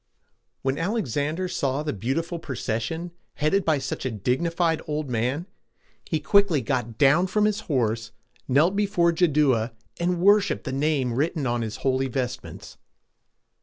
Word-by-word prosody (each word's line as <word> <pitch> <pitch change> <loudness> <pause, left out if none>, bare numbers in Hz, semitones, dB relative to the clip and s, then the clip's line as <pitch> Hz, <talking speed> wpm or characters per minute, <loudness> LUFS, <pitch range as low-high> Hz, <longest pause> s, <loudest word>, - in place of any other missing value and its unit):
When 135 +1 0
Alexander 165 - -1
saw 140 -4 -1
the 150 - -2
beautiful 165 - -2
procession, 140 +4 -3 0.2
headed 170 +7 +1
by 160 -3 +2
such 135 -1 -4
a 130 - -1
dignified 160 - 0
old 150 -3 -3
man, 125 +8 -1 0.6
he 160 - 0
quickly 200 -6 +3
got 125 -4 -2
down 150 +6 +4
from 210 +2 +2
his 210 0 +1
horse, 115 -5 0 0.4
knelt 155 +9 +3
before 200 -4 +2
Jaddua, 145 -9 +2 0.3
and 175 0 0
worshiped 200 +2 +4
the - - -4
name 140 -3 +1
written 150 +3 0
on 120 -1 0
his 110 -1 -4
holy 135 0 +2
vestments. 125 -1 -5
150 Hz, 140 wpm, -25 LUFS, 130-170 Hz, 0.6 s, down